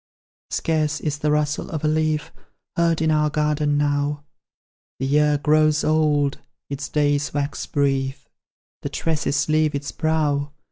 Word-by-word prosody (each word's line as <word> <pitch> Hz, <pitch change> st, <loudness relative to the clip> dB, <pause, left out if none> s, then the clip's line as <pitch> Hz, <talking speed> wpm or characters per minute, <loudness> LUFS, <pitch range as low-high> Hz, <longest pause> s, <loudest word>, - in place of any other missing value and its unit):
"Scarce 155 Hz, -2 st, 0 dB
is 150 Hz, -2 st, -3 dB
the 150 Hz, -, 0 dB
rustle 150 Hz, 0 st, 0 dB
of 155 Hz, -2 st, -4 dB
a -, -, +3 dB
leaf 155 Hz, 0 st, 0 dB, 0.4 s
Heard 165 Hz, -1 st, +2 dB
in 160 Hz, -, +2 dB
our 150 Hz, 0 st, +2 dB
garden 150 Hz, -1 st, +1 dB
now; 145 Hz, 0 st, 0 dB, 0.7 s
The 135 Hz, -, -2 dB
year 150 Hz, +1 st, +3 dB
grows 155 Hz, +1 st, +3 dB
old, 150 Hz, -2 st, +2 dB, 0.3 s
its 140 Hz, 0 st, -4 dB
days 145 Hz, -1 st, +1 dB
wax 145 Hz, 0 st, -2 dB
brief, 135 Hz, -2 st, -1 dB, 0.5 s
The -, -, -3 dB
tresses 150 Hz, -3 st, -1 dB
leave 155 Hz, -1 st, +2 dB
its 140 Hz, 0 st, -4 dB
brow. 150 Hz, -3 st, 0 dB
150 Hz, 140 wpm, -22 LUFS, 145-155 Hz, 0.7 s, a